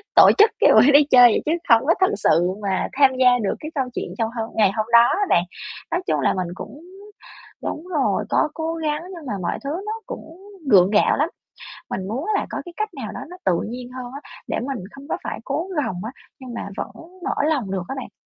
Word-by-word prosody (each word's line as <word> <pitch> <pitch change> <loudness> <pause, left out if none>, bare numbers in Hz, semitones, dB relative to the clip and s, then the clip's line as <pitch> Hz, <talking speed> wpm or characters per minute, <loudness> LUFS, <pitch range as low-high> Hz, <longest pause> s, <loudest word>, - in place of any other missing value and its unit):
tổ - - +9
chức 430 +2 +6
cái - - +6
buổi 245 +7 +7
đi 290 +1 +8
chơi 245 -1 +9
vậy - - +1
chứ 310 - 0 0.2
không 230 +3 +5
có 335 - +6
thực 375 - +3
sự 175 -2 +3
mà 190 -1 0
tham 270 -1 +5
gia 250 -1 +5
được 195 - 0
cái 310 0 -7
câu 265 -2 0
chuyện - - -3
trong 225 0 0
hôm 225 - -3
ngày 205 -3 +4
hôm 215 - +1
đó 235 - +10
á 405 +1 +1
bạn. 170 - +4 0.5
Nói 350 +2 0
chung - - +1
là - - +2
mình 185 -2 -2
cũng 285 - -9 0.8
đúng 330 +4 -5
rồi, 300 -7 0
có 310 - +2
cố 325 0 -3
gắng 310 0 -2
nhưng 320 -4 -10
mà 210 - -2
mọi - - -2
thứ - - -2 0.2
nó 435 - -2
cũng 325 +2 -9 0.3
gượng 185 -1 +7
gạo 210 - +3
lắm. 305 +4 +1 0.6
Mình 190 0 -3
muốn 255 - -3
là - - 0
có - - -4
cái 350 - -10
cách 430 0 -1
nào 260 -7 -6
đó - - -7
nó 360 - -10
tự 170 - +2
nhiên 245 +1 -7
hơn 250 -1 -7
á 280 - -8 0.3
để - - -2
mình 265 -1 -4
không 275 +1 -12
có - - -1
phải - - -5
cố 350 - -2
gồng 185 -11 -2
á, 235 - -5 0.3
nhưng 255 -2 -9
mà 225 - -5
vẫn - - -4 0.4
mở - - -1
lòng 250 -11 -1
được 190 -2 -2
á 270 - -3
bạn? - - -7
260 Hz, 245 wpm, -22 LUFS, 215-310 Hz, 0.8 s, đó